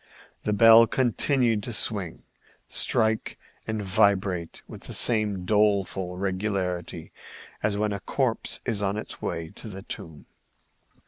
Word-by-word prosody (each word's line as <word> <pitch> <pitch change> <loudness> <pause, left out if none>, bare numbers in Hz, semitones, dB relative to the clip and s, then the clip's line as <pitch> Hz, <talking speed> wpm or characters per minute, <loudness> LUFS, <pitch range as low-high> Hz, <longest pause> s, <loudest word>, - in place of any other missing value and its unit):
The 105 - 0
bell 115 +2 +7
continued 120 -2 +1
to 120 - -6
swing, 100 -6 +1 0.4
strike 110 -1 +1 0.3
and 110 -1 -3
vibrate 95 -3 0
with - - -11
the - - -7
same 105 -5 +1
doleful 100 -3 +1
regularity 95 -2 -3 0.5
as 105 -1 0
when 105 0 -1
a 100 - -4
corpse 125 +1 -1
is 110 -5 -1
on 100 +1 -1
its 110 - -7
way 80 -1 -4
to - - -11
the 95 -2 -8
tomb. 80 -6 -9
105 Hz, 130 wpm, -25 LUFS, 95-110 Hz, 0.5 s, bell